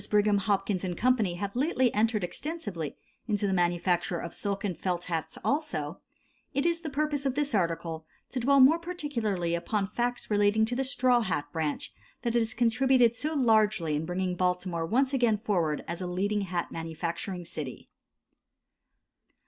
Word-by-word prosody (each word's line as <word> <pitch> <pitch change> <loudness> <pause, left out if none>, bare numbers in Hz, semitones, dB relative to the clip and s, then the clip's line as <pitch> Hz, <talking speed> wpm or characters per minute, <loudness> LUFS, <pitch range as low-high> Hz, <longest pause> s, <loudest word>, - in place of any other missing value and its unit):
Brigham, 210 -1 +3
Hopkins 195 -1 0
& 175 - -6
Co. 250 -1 +3
have 200 +3 -4
lately 260 -2 +2
entered 215 -1 +1
extensively 195 - -4 0.3
into 210 -2 0
the 195 - +1
manufacture 175 0 +1
of 170 - -6
silk 200 -1 -3
and 195 -4 -1
felt 175 -1 -2
hats 165 -3 -3
also, 275 - -1 0.5
it 275 +3 +1
is 340 0 +1
the 320 - -4
purpose 295 0 -1
of 270 -2 0
this 290 -1 -1
article 165 -4 -1 0.2
to 260 - -2
dwell 275 +3 +4
more 285 +6 +7
particularly 235 - -2
upon 195 +4 0
facts 240 +3 -2
relating 205 +1 +4
to 240 +2 -2
the 265 - 0
straw 255 -2 +3
hat 170 -9 -1
branch 155 -3 -2 0.3
that 235 - 0
has 230 -2 +1
contributed 245 0 +4
so 310 +6 -2
largely 215 - +3
in 150 - -1
bringing 180 0 -1
Baltimore 180 -2 0
once 260 +7 +2
again 240 -5 +3
forward 175 -9 0
as 170 +2 -4
a 180 - -2
leading 200 +4 0
hat 180 -3 -3
manufacturing 170 +3 -4
city. 150 -5 -7
205 Hz, 165 wpm, -29 LUFS, 175-250 Hz, 0.5 s, more